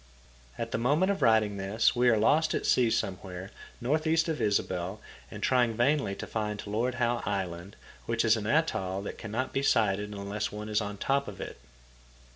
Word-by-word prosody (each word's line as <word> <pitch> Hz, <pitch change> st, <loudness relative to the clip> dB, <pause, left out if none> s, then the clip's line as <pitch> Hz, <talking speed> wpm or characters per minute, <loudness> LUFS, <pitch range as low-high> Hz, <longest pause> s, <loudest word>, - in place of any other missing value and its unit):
At -, -, -4 dB
the -, -, -1 dB
moment 150 Hz, +11 st, +2 dB
of 195 Hz, -, -3 dB
writing 110 Hz, -3 st, +3 dB
this 100 Hz, +3 st, +1 dB
we 125 Hz, 0 st, +4 dB
are 115 Hz, -, +4 dB
lost 150 Hz, +9 st, +3 dB
at -, -, -2 dB
sea 125 Hz, -2 st, +4 dB
somewhere 95 Hz, -2 st, -3 dB, 0.3 s
northeast 160 Hz, +6 st, +1 dB
of 160 Hz, -, -2 dB
Ysabel 95 Hz, -1 st, -1 dB, 0.3 s
and -, -, -8 dB
trying 125 Hz, -3 st, +3 dB
vainly 125 Hz, -3 st, +1 dB
to -, -, -6 dB
find 105 Hz, -2 st, -3 dB
Lord 115 Hz, +5 st, -1 dB
Howe 120 Hz, -1 st, 0 dB
Island, 95 Hz, -2 st, -3 dB, 0.3 s
which 115 Hz, 0 st, +1 dB
is 115 Hz, 0 st, +5 dB
an 110 Hz, -1 st, -4 dB
atoll 100 Hz, -, 0 dB
that -, -, -6 dB
cannot 115 Hz, +4 st, -3 dB
be 135 Hz, -, +1 dB
sighted 105 Hz, -6 st, +2 dB
unless 100 Hz, +1 st, -3 dB
one 105 Hz, +1 st, -6 dB
is 105 Hz, +1 st, +1 dB
on 105 Hz, 0 st, -5 dB
top 140 Hz, +5 st, 0 dB
of 100 Hz, -, -8 dB
it. -, -, -7 dB
110 Hz, 185 wpm, -29 LUFS, 100-125 Hz, 0.3 s, is